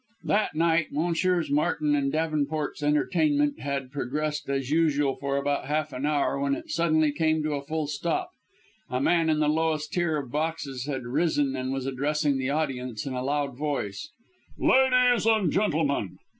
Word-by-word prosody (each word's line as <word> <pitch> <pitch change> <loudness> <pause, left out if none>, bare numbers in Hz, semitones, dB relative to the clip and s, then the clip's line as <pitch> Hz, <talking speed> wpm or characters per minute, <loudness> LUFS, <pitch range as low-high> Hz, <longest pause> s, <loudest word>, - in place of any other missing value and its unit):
That 205 -6 +1
night 165 0 +2
Messrs. 170 +1 0
Martin 150 0 +1
and 140 -1 +1
Davenport's 155 -1 -1
entertainment 150 -1 +1
had 140 -2 -3
progressed 150 +2 -3
as 135 -1 -2
usual 145 -4 +2
for 140 0 -2
about 140 0 -1
half 150 0 -1
an 135 +3 -2
hour 145 -2 +1
when 140 0 +1
it - - -8
suddenly 155 -2 +2
came 155 0 +1
to 155 0 -1
a 140 - -2
full 155 +1 -2
stop. 170 - -2 0.6
A 125 - -1
man 165 +3 +2
in 155 - +2
the 150 -1 +2
lowest 155 0 0
tier 170 -3 +1
of 135 -4 -5
boxes 145 -4 -3
had 135 -3 -3
risen 140 +1 +1
and 130 0 -3
was 135 -1 -3
addressing 140 +1 0
the 130 0 -1
audience 130 -6 -2
in 135 - -4
a 125 - -2
loud 140 0 -1
voice: 140 -4 -3 0.5
"Ladies 250 -3 +4
and 215 -8 +3
gentlemen!" 155 - 0
150 Hz, 170 wpm, -26 LUFS, 140-160 Hz, 0.6 s, Ladies